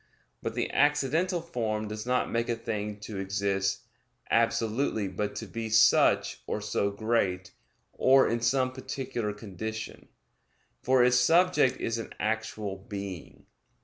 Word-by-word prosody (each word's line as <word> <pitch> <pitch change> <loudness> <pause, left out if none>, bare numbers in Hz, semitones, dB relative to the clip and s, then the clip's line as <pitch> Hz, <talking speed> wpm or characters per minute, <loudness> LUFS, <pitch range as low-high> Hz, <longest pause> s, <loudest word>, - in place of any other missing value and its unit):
But - - -4
the - - -1
accidental 150 +5 +2
form 110 -10 -3
does 105 +2 -6
not 125 0 +1
make 115 0 -1
a 120 - +1
thing 105 -2 -4
to 105 -2 -6
exist 95 0 -1 0.5
absolutely 115 -1 +1
but 105 +2 -3
to - - -5
be 115 -1 -5
such, 110 - +4
or - - -2
so 100 - -1
great, 100 -4 -1 0.4
or 135 +1 +5
in 115 0 -1
some 130 +2 +2
particular 130 -4 -4
condition; 110 +1 -7 0.7
for 130 -1 +4
its 125 0 +4
subject 165 -1 +4
is 115 0 -2
an 115 - -7
actual 110 -2 -2
being. 100 -3 -8
110 Hz, 135 wpm, -28 LUFS, 105-125 Hz, 0.7 s, or